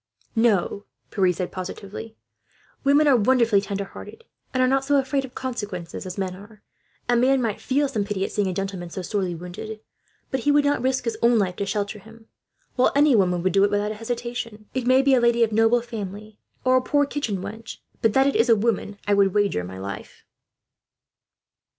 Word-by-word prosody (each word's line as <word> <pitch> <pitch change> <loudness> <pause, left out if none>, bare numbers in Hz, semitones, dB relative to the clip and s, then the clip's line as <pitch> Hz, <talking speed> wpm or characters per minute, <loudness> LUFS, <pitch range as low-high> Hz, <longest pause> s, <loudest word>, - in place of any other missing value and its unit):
"No," 210 -3 +1 0.3
Pierre 185 -3 +2
said 180 +1 -4
positively. 200 +4 -7 0.7
"Women 285 +2 +4
are 280 - +6
wonderfully 235 -2 +3
tender 200 0 -3
hearted, 435 - -11 0.3
and 255 -1 +1
are - - +4
not 270 +1 +2
so 285 +1 +1
afraid 270 0 0
of 255 - -14
consequences 205 -9 -5
as 185 - -7
men 190 -2 -2
are. 205 +2 -15 0.4
A 240 - +3
man 260 +3 +3
might 225 -4 -2
feel 285 +2 +1
some 225 -7 -1
pity, 200 -1 -2
at - - -6
seeing 205 -2 0
a 185 - -2
gentleman 195 -2 -4
so 185 +2 -6
sorely 185 -2 -2
wounded, 180 +6 -7 0.5
but 265 - 0
he 290 +4 +2
would 290 0 +4
not 285 -3 +1
risk 260 0 0
his 230 -2 -3
own 235 0 +4
life 185 -4 0
to 200 - -2
shelter 205 +1 -2
him; 225 +2 -16 0.5
while 255 - +3
any 290 -2 +5
woman 180 -4 +2
would 185 -2 +1
do 195 - +4
it, 205 - +4
without 205 +1 0
hesitation. 230 -1 -5
It 255 -2 -2
may 260 +1 +5
be 275 0 +4
a 255 - +4
lady 235 0 +4
of 225 - +1
noble 225 +2 +3
family, 210 -2 -7 0.3
or 255 0 +5
a - - +2
poor 285 +3 +2
kitchen 280 -8 -3
wench, 220 +4 -8 0.2
but 225 -2 +3
that 265 0 +4
it 280 - +1
is 230 +2 +3
a 230 - +7
woman 210 -2 -1
I 205 - +3
would 200 -1 +3
wager 205 - +1
my 95 +1 -8
life." 100 +1 -8
220 Hz, 205 wpm, -24 LUFS, 195-255 Hz, 0.7 s, a